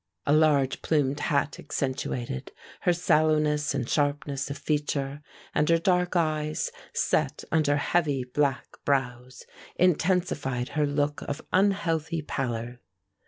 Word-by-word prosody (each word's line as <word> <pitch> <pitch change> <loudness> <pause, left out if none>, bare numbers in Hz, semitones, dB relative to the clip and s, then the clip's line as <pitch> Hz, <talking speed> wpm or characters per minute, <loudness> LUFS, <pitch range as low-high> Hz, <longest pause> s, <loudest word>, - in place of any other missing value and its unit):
A 145 - +3
large 150 -4 +3
plumed 145 -2 +1
hat 145 -1 0
accentuated, 130 - -3 0.3
her 180 - +2
sallowness 150 -3 +2
and 125 -4 -2
sharpness 145 -1 -1
of 140 - -4
feature, 145 -1 -2 0.3
and 150 +1 +2
her 165 - +5
dark 180 +1 +1
eyes, 155 - 0 0.2
set - - 0
under 150 -3 +3
heavy 145 -3 +1
black 135 0 -2
brows, 125 -2 -2 0.3
intensified 160 -8 +1
her 150 -2 +1
look 145 +1 -1
of 145 +1 -4
unhealthy 170 -5 +1
pallor. 120 -3 -3
145 Hz, 120 wpm, -27 LUFS, 135-160 Hz, 0.3 s, her